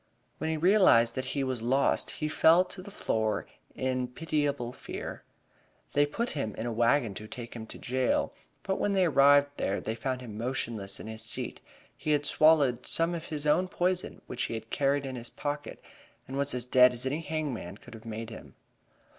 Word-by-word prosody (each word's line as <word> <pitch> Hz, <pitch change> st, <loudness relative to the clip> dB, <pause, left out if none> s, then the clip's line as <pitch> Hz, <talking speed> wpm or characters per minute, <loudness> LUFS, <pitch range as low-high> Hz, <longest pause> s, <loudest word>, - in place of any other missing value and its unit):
When 160 Hz, -, -1 dB
he 160 Hz, -, 0 dB
realized 160 Hz, -, +5 dB
that 130 Hz, +1 st, -3 dB
he 140 Hz, -, +1 dB
was 130 Hz, -3 st, -2 dB
lost 130 Hz, +4 st, +2 dB
he 155 Hz, -, -3 dB
fell 165 Hz, +3 st, +5 dB
to 185 Hz, +1 st, -9 dB
the 190 Hz, -, -10 dB
floor 110 Hz, -, -1 dB, 0.3 s
in 130 Hz, -1 st, -1 dB
pitiable 145 Hz, -3 st, -1 dB
fear. -, -, -7 dB, 0.7 s
They 145 Hz, 0 st, +4 dB
put 235 Hz, +11 st, -2 dB
him 110 Hz, -8 st, -3 dB
in 110 Hz, -, -4 dB
a 120 Hz, -, -1 dB
wagon 115 Hz, 0 st, +2 dB
to 110 Hz, +3 st, -8 dB
take 120 Hz, +1 st, -8 dB
him 110 Hz, -1 st, -7 dB
to -, -, -8 dB
jail, 130 Hz, 0 st, 0 dB, 0.3 s
but 190 Hz, -1 st, -1 dB
when 205 Hz, -, +1 dB
they 190 Hz, -2 st, +4 dB
arrived 145 Hz, -1 st, +5 dB
there 100 Hz, -, 0 dB
they 110 Hz, -, -3 dB
found 130 Hz, +3 st, -3 dB
him 110 Hz, -4 st, -8 dB
motionless 115 Hz, -5 st, -3 dB
in -, -, -8 dB
his 110 Hz, 0 st, -5 dB
seat. 110 Hz, -, -3 dB, 0.3 s
He 155 Hz, -, 0 dB
had 145 Hz, 0 st, +1 dB
swallowed 145 Hz, -5 st, +4 dB
some 165 Hz, +1 st, +2 dB
of 170 Hz, -1 st, -4 dB
his 150 Hz, -1 st, -4 dB
own 175 Hz, +5 st, +3 dB
poison 180 Hz, 0 st, -1 dB
which 125 Hz, -, -5 dB
he 115 Hz, -, -3 dB
carried 140 Hz, +5 st, 0 dB
in 130 Hz, -1 st, -5 dB
his 120 Hz, -1 st, -7 dB
pocket, 145 Hz, 0 st, -5 dB, 0.5 s
and 135 Hz, -, -6 dB
was 140 Hz, -1 st, 0 dB
as 125 Hz, -1 st, 0 dB
dead 125 Hz, 0 st, +6 dB
as 125 Hz, +1 st, -4 dB
any 145 Hz, +5 st, -1 dB
hangman 145 Hz, -, -4 dB
could -, -, -14 dB
have 110 Hz, -1 st, -11 dB
made 115 Hz, 0 st, -6 dB
him. 110 Hz, -, -11 dB
130 Hz, 195 wpm, -29 LUFS, 115-155 Hz, 0.7 s, dead